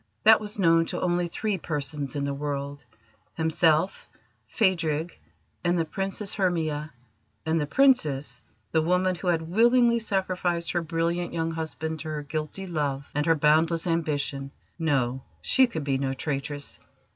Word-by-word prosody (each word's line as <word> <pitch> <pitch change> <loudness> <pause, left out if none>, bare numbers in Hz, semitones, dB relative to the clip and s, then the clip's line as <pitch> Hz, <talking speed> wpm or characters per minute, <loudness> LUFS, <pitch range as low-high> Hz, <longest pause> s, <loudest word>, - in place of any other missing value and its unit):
That 220 0 +7
was 210 0 -5
known 165 -3 +4
to - - -3
only 175 -1 +1
three 200 +3 -2
persons 145 -3 -3
in 140 - -1
the 140 0 -1
world 140 0 -4 0.5
himself, 160 +2 +2 0.4
Phadrig, 170 -6 +1 0.5
and 175 0 +2
the 165 - +1
Princess 195 +4 -3
Hermia; 160 -6 -1 0.5
and 160 0 +1
the 145 - -2
Princess, 155 - +2 0.3
the 160 - +3
woman 180 +3 +2
who 180 +1 -6
had 165 -2 +2
willingly 235 +6 +4
sacrificed 185 -5 -1
her 175 - 0
brilliant 170 +1 -1
young 165 -1 -1
husband 160 0 -4
to 160 - -6
her 155 -1 -3
guilty 155 +6 -4
love 145 -5 -2
and 150 +2 0
her 165 - +5
boundless 160 +3 +3
ambition 145 -5 -1 0.3
no, 135 -5 0 0.2
she 260 -1 +4
could 160 -10 -4
be 135 -2 0
no 135 -1 -1
traitress. 145 +1 -4
160 Hz, 150 wpm, -26 LUFS, 150-180 Hz, 0.5 s, That